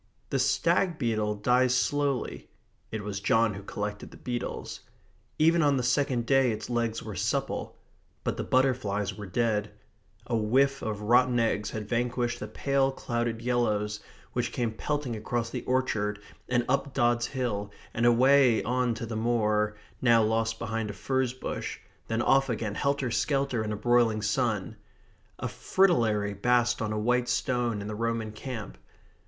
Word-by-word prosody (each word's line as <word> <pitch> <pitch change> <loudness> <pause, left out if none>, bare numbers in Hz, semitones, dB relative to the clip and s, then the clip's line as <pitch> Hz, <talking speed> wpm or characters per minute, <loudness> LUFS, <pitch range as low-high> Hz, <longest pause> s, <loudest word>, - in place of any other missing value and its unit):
The 135 - +1
stag 170 +6 +2
beetle 110 -5 0
dies 125 +4 +3
slowly 145 0 -1 0.4
(it 110 -1 -4
was 100 -1 -4
John 115 +1 +2
who 100 - -7
collected 105 +1 -5
the - - -14
beetles). 120 -1 -4 0.6
Even 165 +2 +4
on 145 -3 +3
the 125 - -1
second 125 -1 +1
day 135 -1 +4
its 110 +2 -5
legs 115 -2 -1
were - - -6
supple. - - -2 0.5
But - - -1
the - - -3
butterflies 110 -7 +1
were 105 0 -7
dead. 105 0 0 0.6
A 120 - -1
whiff 135 +6 +2
of 105 -1 -3
rotten 120 +2 +4
eggs 105 -2 0
had 110 -1 -5
vanquished 120 +1 -1
the 105 - -5
pale 135 +4 +1
clouded 120 -3 -3
yellows 105 -4 0 0.3
which - - -1
came 120 -2 -1
pelting 145 0 -2
across 115 +2 -2
the - - -3
orchard 110 -5 0 0.3
and 120 -1 +2
up 140 +1 0
Dods 120 -2 +2
Hill 115 -6 -2 0.2
and 115 - -1
away 125 0 +5
on 125 -1 0
to 115 - -5
the 115 0 -5
moor, 105 -2 +1 0.2
now 115 -3 +5
lost 115 +1 0
behind 115 -2 -3
a - - -4
furze 130 +2 -1
bush, 130 - -5 0.3
then 115 +1 0
off 135 0 +3
again 110 -3 -2
helter 140 0 0
skelter 135 -3 0
in 110 - -3
a 105 - -2
broiling 115 -2 +2
sun. 110 -2 -1 0.6
A - - -3
fritillary 115 - +2
basked 120 +3 +2
on 110 -1 -1
a 105 - -1
white 125 +3 +1
stone 120 -3 0
in - - -6
the 110 - -4
Roman 115 0 -2
camp. 110 - -7
120 Hz, 160 wpm, -28 LUFS, 110-130 Hz, 0.6 s, away